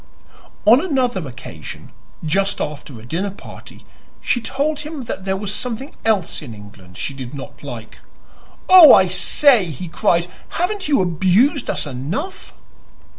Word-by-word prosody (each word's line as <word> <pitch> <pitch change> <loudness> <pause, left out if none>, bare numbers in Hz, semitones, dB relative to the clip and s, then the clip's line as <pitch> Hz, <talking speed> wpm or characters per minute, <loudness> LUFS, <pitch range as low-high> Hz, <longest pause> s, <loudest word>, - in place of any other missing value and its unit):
On 240 +8 +6
another 250 - -1
occasion 120 -11 -10 0.3
just 195 +5 0
after 145 -5 -6
a 110 - -13
dinner 175 +10 -2
party 200 - -13 0.3
she 240 - 0
told 285 +6 -2
him 300 -2 -6
that 195 -4 -6
there 190 0 -1
was 200 0 -4
something 250 +5 -4
else 210 -8 0
in 120 -7 -9
England 100 -3 -15
she 140 - -4
did 130 0 -8
not 135 - -10
like. 120 -6 -9 0.7
"Oh, 360 -6 +10
I 190 - +4
say!" 205 +5 +4
he 165 +1 -7
cried, 170 +1 +1 0.3
"haven't 370 +2 -1
you 285 -9 +3
abused 190 - +2
us - - -2
enough?" 150 - -5
190 Hz, 145 wpm, -19 LUFS, -, 0.7 s, Oh